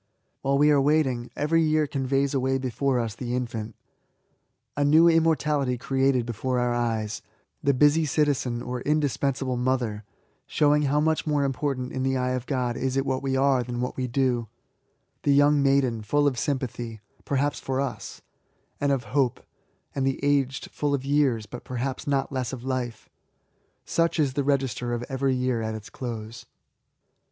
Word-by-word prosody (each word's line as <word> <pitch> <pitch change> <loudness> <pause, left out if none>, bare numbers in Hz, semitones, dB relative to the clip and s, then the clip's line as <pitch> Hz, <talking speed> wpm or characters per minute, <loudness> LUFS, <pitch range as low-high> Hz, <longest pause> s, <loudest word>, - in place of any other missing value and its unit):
While 140 +1 +1
we 150 +1 +5
are 145 -2 +4
waiting, 135 -5 +1
every 165 +3 +2
year 155 -1 +2
conveys 135 0 0
away 135 0 +1
before 130 0 0
us 115 -3 -2
the 125 +1 -4
infant, 115 -3 -4 1.0
(a 145 - +1
new 155 +4 +6
immortality 150 -5 +2
created 135 -1 +1
before 125 +2 -2
our 125 0 +1
eyes); 115 -3 -1 0.4
the 140 -1 +2
busy 150 +4 +4
citizen, 135 -5 0
or 125 0 -4
indispensable 140 -3 0
mother, 120 -4 -1 0.4
(showing 150 0 +3
how 145 +2 +2
much 160 0 0
more 145 -2 +2
important 135 -1 -2
in 130 - -3
the 135 0 +1
eye 125 0 0
of 130 -1 -3
God 125 -4 -1
is 130 0 -1
it 135 - +1
what 130 -1 -1
we 135 -1 -1
are 135 -1 +3
than 120 0 -4
what 125 +1 -2
we 130 -1 -2
do 125 -2 0 0.4
;) - - -46
the 140 - +3
young 145 0 +5
maiden, 135 -5 +2
full 145 +8 +1
of 130 -4 +1
sympathy, 120 -5 -3 0.2
(perhaps 140 +1 0
for 130 0 -2
us,) 140 -1 -5 0.6
and 145 0 +1
of 135 -3 0
hope; 135 -4 +1 0.5
and 135 -1 0
tl^e 135 - -1
aged, 140 -2 0
fiill 145 -1 0
of 135 -1 -5
years, 135 -6 +2
but 120 +3 -9
perhaps 130 +2 -4
not 140 -1 0
less 130 -3 -2
of 125 -2 -7
life. 130 -3 -3 0.8
Such 165 -1 +1
is 140 -4 +2
the 140 +1 0
register 130 -3 0
of 120 - -4
every 135 0 0
year 125 -2 0
at 110 0 -3
its 110 -1 -9
close. 115 -2 -7
135 Hz, 175 wpm, -26 LUFS, 125-140 Hz, 1.0 s, new